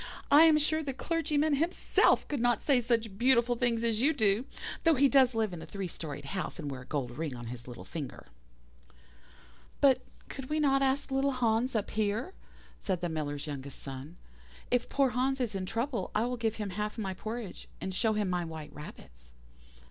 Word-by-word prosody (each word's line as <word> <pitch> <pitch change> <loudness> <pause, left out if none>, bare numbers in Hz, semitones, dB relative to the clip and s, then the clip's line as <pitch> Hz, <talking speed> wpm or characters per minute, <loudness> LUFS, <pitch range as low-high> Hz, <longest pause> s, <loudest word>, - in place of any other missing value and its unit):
I 300 +3 +9
am 315 -2 +6
sure 315 +1 +2
the 275 -4 -4
clergyman 310 0 +1
himself 330 +5 +2
could 290 - -2
not 240 0 +2
say 270 -4 +4
such 230 -4 -1
beautiful 245 -1 +4
things 235 -1 +1
as 225 -1 +1
you 300 +5 +4
do, 215 +2 +2 0.4
though 330 -2 +5
he 280 +1 +5
does 260 -3 +4
live 220 -4 0
in 170 - -6
a - - -7
three 195 +3 -4
storied 145 -4 -7
house, 185 +6 -4
and 145 -4 -4
wear 130 -1 -6
a - - -12
gold 130 -5 -3
ring 155 -5 -2
on 120 0 -8
his 120 0 -9
little 120 -1 -8
finger.' 150 -5 -6 1.5
"'But 270 -2 +5 0.3
could 270 -2 -7
we 305 +1 0
not 275 -2 +3
ask 275 +1 +1
little 270 +1 +2
Hans 240 0 +1
up 215 - -1
here?' 220 - -1 0.5
said 185 -4 -2
the 175 - -1
Miller's 145 -2 -3
youngest 140 -2 -6
son. 135 +5 -8 0.5
'If 245 -1 +1
poor 275 -2 +2
Hans 265 +2 0
is 240 -4 -1
in 190 -1 -3
trouble 235 +4 -2
I 215 +2 +2
will 250 +1 -1
give 225 -1 -1
him 210 -3 -4
half 210 +3 -3
my 195 -4 -2
porridge, 220 +1 -6
and 190 - -4
show 220 +3 +2
him 210 -2 0
my 180 -1 0
white 160 -2 -7
rabbits. - - -11
225 Hz, 200 wpm, -31 LUFS, 175-265 Hz, 1.5 s, I